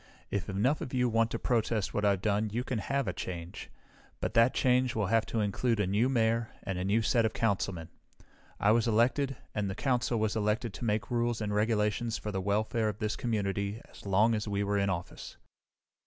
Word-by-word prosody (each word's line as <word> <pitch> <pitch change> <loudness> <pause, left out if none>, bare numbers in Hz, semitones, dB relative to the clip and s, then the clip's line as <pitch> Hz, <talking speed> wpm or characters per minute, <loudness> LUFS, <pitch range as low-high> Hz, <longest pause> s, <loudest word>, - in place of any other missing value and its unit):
If 100 -2 -2
enough 115 +10 +1
of 130 - -4
you 125 -1 +3
want 115 0 +2
to 115 - -3
protest 115 -3 0
what 105 - -1
I've 100 -2 +2
done 105 0 +1
you 120 +4 -2
can 130 -3 -2
have 140 +3 -1
a 90 - -1
change, 85 -1 -6 0.5
but - - -2
that 115 +2 +5
change 125 -1 +2
will 110 -2 +1
have 110 +3 +2
to 115 - -1
include 110 +3 0
a 105 - +2
new 105 +7 +2
mayor 115 -2 +1
and 95 -2 -3
a - - -2
new 105 +4 +2
set 115 +1 +3
of 110 - 0
councilmen. 95 -6 -1 0.7
I 105 - +4
was 115 +1 +3
elected, 130 +5 +2 0.2
and 105 -2 -1
the 95 - -4
Council 125 -2 0
was 110 0 0
elected 110 +1 0
to 120 - -5
make 105 +2 -1
rules 120 -1 0
and 105 -1 -2
regulations 110 +1 +1
for 105 - -5
the 95 -1 -2
welfare 110 +3 0
of 105 - -5
this 105 0 -2
community 100 -2 -2
as - - -14
long 105 +4 +3
as 110 0 -2
we 100 0 0
were 100 0 0
in 100 0 +1
office. 90 -2 -5
110 Hz, 215 wpm, -30 LUFS, 100-115 Hz, 0.7 s, that